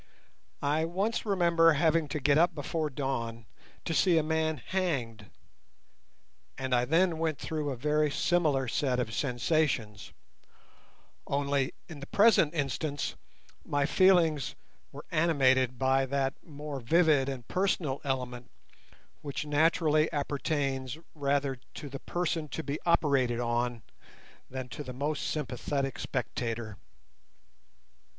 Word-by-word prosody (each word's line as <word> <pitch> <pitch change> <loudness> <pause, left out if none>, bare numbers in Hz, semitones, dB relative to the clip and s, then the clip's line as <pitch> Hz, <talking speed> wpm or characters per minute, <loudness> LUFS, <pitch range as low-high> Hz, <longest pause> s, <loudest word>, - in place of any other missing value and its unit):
I 150 +3 +1
once 195 +8 -1
remember 170 -4 +4
having 160 +1 +2
to 150 - -3
get 140 +1 +3
up 170 +2 +3
before 155 +1 -2
dawn 120 -5 -3 0.4
to 165 - -1
see 175 +1 +4
a 160 - +3
man 160 0 0
hanged, 130 - -3 1.3
and 130 -1 -2
I 120 0 +3
then 165 +3 +2
went 160 -3 0
through 155 -2 -3
a 135 - -2
very 150 +4 +1
similar 145 -4 +1
set 125 +1 0
of 110 -3 -2
sensations, 120 -3 0 1.2
only 140 -1 0
in 160 -4 -9
the 140 - -8
present 200 -7 +4
instance 145 0 -2 0.5
my 145 -1 0
feelings 165 - +3 0.4
were - - -10
animated 130 -6 +3
by 135 +1 +2
that 135 0 0
more 150 -2 -7
vivid 150 +1 +3
and 125 -4 -6
personal 180 -7 0
element 125 -3 -3 0.7
which 145 0 -4
naturally 155 +1 +2
appertains 140 -2 -2 0.2
rather 140 -2 0 0.2
to 145 - -7
the 135 0 -7
person 165 -3 -2
to 160 - -5
be 145 +1 -3
operated 140 -8 +2
on 120 -1 -1 0.7
than 130 -1 -5
to 150 - -6
the 130 -2 -7
most 145 +4 -2
sympathetic 135 -1 -2
spectator. 115 -4 -3
145 Hz, 125 wpm, -30 LUFS, 130-160 Hz, 1.3 s, remember